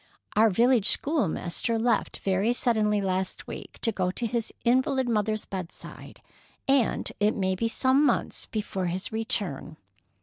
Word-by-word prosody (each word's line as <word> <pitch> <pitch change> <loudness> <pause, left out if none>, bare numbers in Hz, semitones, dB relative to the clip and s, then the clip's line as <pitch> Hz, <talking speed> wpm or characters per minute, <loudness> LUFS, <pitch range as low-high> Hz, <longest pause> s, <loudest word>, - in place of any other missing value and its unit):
"Our 220 +1 +5
village 230 +1 +3
schoolmaster 230 - +1
left 225 -1 0
very 195 +4 +1
suddenly 215 -4 +1
last 190 -1 -2
week, - - -9
to 230 - +3
go 185 -3 -1
to 235 +6 -2
his 230 0 -2
invalid 260 +1 +2
mother's 215 -1 0
bedside, 185 -3 -8 0.4
and 270 -4 +2
it 210 +1 +2
may 190 -2 0
be 230 +5 -1
some 260 +4 +2
months 275 -5 0
before 195 -4 -3
his 180 +2 -4
return. 200 -9 -2
215 Hz, 140 wpm, -27 LUFS, 190-240 Hz, 0.4 s, Our